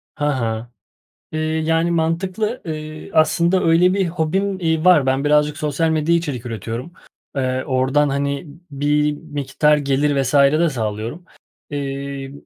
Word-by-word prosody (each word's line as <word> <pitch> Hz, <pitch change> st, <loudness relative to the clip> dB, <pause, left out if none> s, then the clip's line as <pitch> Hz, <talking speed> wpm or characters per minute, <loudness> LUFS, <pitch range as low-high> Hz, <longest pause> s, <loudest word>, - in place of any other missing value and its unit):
Ha 145 Hz, -3 st, 0 dB
ha. 115 Hz, +1 st, -3 dB, 0.6 s
Eee, 155 Hz, -, -2 dB
yani 160 Hz, +1 st, 0 dB
mantıklı. 185 Hz, +8 st, -1 dB
Iıı, 155 Hz, 0 st, -6 dB
aslında 170 Hz, +4 st, +3 dB
öyle 175 Hz, +3 st, +4 dB
bir 195 Hz, -2 st, +1 dB
hobim, 185 Hz, +4 st, -1 dB
iii, 160 Hz, -1 st, 0 dB
var. 165 Hz, -7 st, +6 dB
Ben 135 Hz, +2 st, +1 dB
birazcık 150 Hz, 0 st, +3 dB
sosyal 155 Hz, +2 st, 0 dB
medyaya 160 Hz, +2 st, +2 dB
içerik 135 Hz, -7 st, -5 dB
üretiyorum. 115 Hz, -, -5 dB, 0.4 s
Eee, 130 Hz, -1 st, -1 dB
oradan 135 Hz, +3 st, +2 dB
hani 140 Hz, +2 st, -2 dB, 0.3 s
b 140 Hz, 0 st, -9 dB
bir 150 Hz, 0 st, +2 dB
miktar 150 Hz, 0 st, +1 dB
gelir 140 Hz, 0 st, +1 dB
vs. 130 Hz, +2 st, -2 dB
de 150 Hz, +4 st, +4 dB
sağlıyorum. 115 Hz, +6 st, -4 dB, 0.5 s
Eee, 140 Hz, -1 st, -5 dB
150 Hz, 140 wpm, -20 LUFS, 135-165 Hz, 0.6 s, var